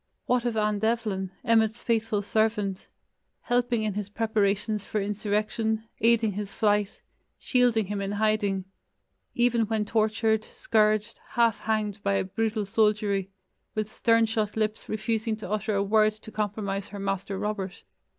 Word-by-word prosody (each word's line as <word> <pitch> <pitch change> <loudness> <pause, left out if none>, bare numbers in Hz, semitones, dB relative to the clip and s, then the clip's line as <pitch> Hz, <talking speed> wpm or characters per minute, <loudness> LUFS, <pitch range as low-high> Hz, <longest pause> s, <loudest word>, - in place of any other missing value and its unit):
What 245 -1 +1
of 235 -2 0
Anne 210 -1 +1
Devlin, 215 -4 0 0.2
Emmet's 225 0 +2
faithful 225 -3 0
servant, 210 -2 0 0.5
helping 245 -2 +1
in 215 -2 -1
his 205 0 -4
preparations 210 -1 0
for 215 - -2
insurrection, 215 +2 -1
aiding 230 -1 +3
his 200 0 -5
flight, 205 -1 +1 0.4
shielding 245 -4 +2
him 200 +1 -3
in 195 +1 -2
hiding, 205 -2 +1 0.7
even 240 -2 +2
when 220 -1 0
tortured, 220 0 +1
scourged, 215 0 +1
half 230 -2 +3
hanged 215 -2 -1
by 200 0 +1
a - - +1
brutal 215 +2 -1
soldiery, 205 -2 +1 0.5
with 215 0 -2
stern 230 0 +3
shut 220 -1 -2
lips 215 0 -1
refusing 220 +1 -1
to 215 -2 -8
utter 215 0 0
a 200 - +2
word 215 +1 +3
to 220 0 -12
compromise 205 -2 -2
her 205 - -8
"Master 195 0 -2
Robert"? 200 -2 -4
215 Hz, 145 wpm, -27 LUFS, 205-225 Hz, 0.7 s, aiding